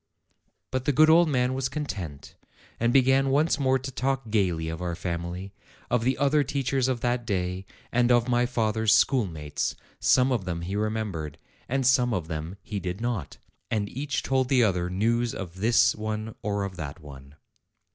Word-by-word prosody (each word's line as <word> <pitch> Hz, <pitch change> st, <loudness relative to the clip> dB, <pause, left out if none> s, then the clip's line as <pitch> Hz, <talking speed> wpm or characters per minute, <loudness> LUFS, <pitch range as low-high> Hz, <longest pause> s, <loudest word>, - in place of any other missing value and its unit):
But 130 Hz, 0 st, -2 dB
the -, -, +3 dB
good 155 Hz, +3 st, +6 dB
old 170 Hz, 0 st, +5 dB
man 125 Hz, -2 st, +1 dB
was 135 Hz, 0 st, -1 dB
content, 95 Hz, -, -6 dB, 0.5 s
and 115 Hz, +1 st, +2 dB
began 135 Hz, +1 st, +4 dB
once 145 Hz, +2 st, +2 dB
more 130 Hz, -1 st, +3 dB
to 135 Hz, +1 st, -6 dB
talk 130 Hz, -2 st, -2 dB
gayly 90 Hz, -7 st, +1 dB
of 80 Hz, +1 st, -5 dB
our 85 Hz, -1 st, -2 dB
family, 90 Hz, +2 st, -5 dB, 0.4 s
of 120 Hz, -2 st, +2 dB
the 130 Hz, +2 st, +1 dB
other 145 Hz, +1 st, +3 dB
teachers 135 Hz, -1 st, 0 dB
of 125 Hz, -3 st, -1 dB
that 120 Hz, 0 st, 0 dB
day, 95 Hz, -3 st, -2 dB, 0.2 s
and 120 Hz, 0 st, +3 dB
of 120 Hz, 0 st, +4 dB
my 120 Hz, 0 st, +2 dB
father's 110 Hz, -3 st, +2 dB
schoolmates; 85 Hz, -, 0 dB, 0.2 s
some 125 Hz, +7 st, +4 dB
of 120 Hz, -6 st, 0 dB
them 85 Hz, -2 st, -3 dB
he 95 Hz, +3 st, -4 dB
remembered, 105 Hz, -8 st, -3 dB, 0.3 s
and 135 Hz, +1 st, 0 dB
some 125 Hz, -2 st, +4 dB
of 85 Hz, -4 st, -3 dB
them 80 Hz, +3 st, -5 dB
he 105 Hz, -2 st, -4 dB
did 90 Hz, +1 st, -4 dB
not. 115 Hz, -, -3 dB, 0.3 s
And 105 Hz, -3 st, -1 dB
each 145 Hz, +2 st, -2 dB
told 130 Hz, -1 st, +1 dB
the 130 Hz, -3 st, +4 dB
other 90 Hz, -4 st, +1 dB
news 115 Hz, +5 st, 0 dB
of 90 Hz, -2 st, -7 dB
this 115 Hz, +5 st, +4 dB
one 110 Hz, 0 st, -4 dB
or 100 Hz, -2 st, -1 dB
of 95 Hz, -2 st, -5 dB
that 75 Hz, 0 st, -6 dB
one. 70 Hz, -2 st, -13 dB
110 Hz, 180 wpm, -26 LUFS, 90-130 Hz, 0.5 s, good